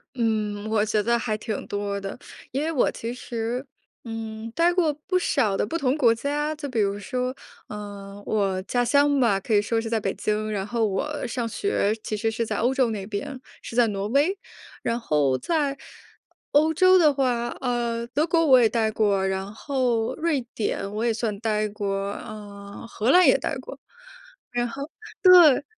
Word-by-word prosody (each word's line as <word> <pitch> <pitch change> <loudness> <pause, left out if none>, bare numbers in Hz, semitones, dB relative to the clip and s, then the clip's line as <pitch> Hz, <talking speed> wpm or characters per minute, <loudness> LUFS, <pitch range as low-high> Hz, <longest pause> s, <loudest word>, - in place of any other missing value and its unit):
嗯， 215 -3 -1
我 215 -1 +2
觉 215 -1 +1
得 235 +1 +2
还 215 -3 -2
挺 215 -1 -4
多 200 0 -3
的。 195 +5 -6 0.3
因 275 +3 -2
为 320 - -1
我 290 - +2
其 235 +2 -5
实， 240 +1 -4 0.4
嗯， 225 0 -6
待 335 +2 +4
过 345 -4 +2
不 365 +6 -1
少 210 - +1
的 - - 0
不 335 - -2
同 270 -1 +1
国 240 -6 +4
家。 295 +5 -2
就 295 -2 -6
比 240 - -3
如 200 0 0
说， 250 +5 -3 0.3
呃， 205 -1 -8
我 195 -3 0
家 245 +2 0
乡 285 +2 +3
吧， 210 -6 +3
可 220 +3 -1
以 205 - +4
说 225 +1 0
是 225 - -5
在 225 -1 +1
北 195 -2 -2
京。 215 0 -2
然 195 -1 -2
后 230 -1 0
我 290 +10 -2
上 235 0 -3
学 225 - 0
其 215 - -3
实 225 +2 0
是 225 +1 -2
在 - - -3
欧 245 +4 +1
洲 260 -3 +2
那 200 -3 -4
边， 220 +6 -5 0.2
是 - - -8
在 240 -1 +4
挪 200 -1 -3
威。 290 - +2 0.5
然 235 +1 -1
后 145 - +1
在 290 - -1 0.7
欧 310 +2 +3
洲 370 +3 +6
的 305 -4 +5
话， 245 -3 0
呃， 235 -2 -1
德 300 +6 0
国 330 -1 +2
我 260 -5 +7
也 230 - +5
待 220 -1 +1
过， 205 -3 +1
然 190 +1 -2
后 245 -3 0
瑞 320 -5 0
典 205 -2 -2
我 215 - -2
也 230 - +1
算 215 -3 -2
待 215 -1 0
过， 205 -1 -4 0.2
呃， 205 -2 -9
荷 230 +1 -1
兰 360 +4 +7
也 - - +6
待 - - -3
过。 - - -9 0.7
然 240 -1 -1
后 275 +4 -6 0.4
对。 345 -7 +8
230 Hz, 205 characters per minute, -25 LUFS, 210-275 Hz, 0.7 s, 对